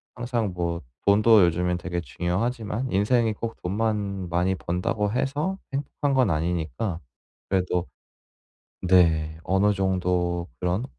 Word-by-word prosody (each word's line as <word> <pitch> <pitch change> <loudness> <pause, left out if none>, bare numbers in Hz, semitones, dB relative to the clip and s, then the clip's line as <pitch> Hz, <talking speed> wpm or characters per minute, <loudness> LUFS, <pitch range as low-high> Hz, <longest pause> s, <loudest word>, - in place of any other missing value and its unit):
항상 120 -5 -2
뭐 85 -1 -2 0.3
돈도 105 +1 +6
요즘에 90 +1 +1
되게 90 0 -3
중요하지만 105 - -2
인생이 110 +3 +2
꼭 115 +2 -5
돈만 100 -1 -1
많이 90 +3 +1
번다고 95 +4 -1
해서 145 - -1 0.2
행복한 140 +1 -1
건 130 -2 +3
아니니까 85 +4 -2 0.5
그래도 90 -2 0 0.9
네 80 -4 +3
어느 100 +2 +3
정도 90 -2 0
그런 90 +7 0
95 Hz, 250 characters per minute, -25 LUFS, 90-115 Hz, 0.9 s, 돈도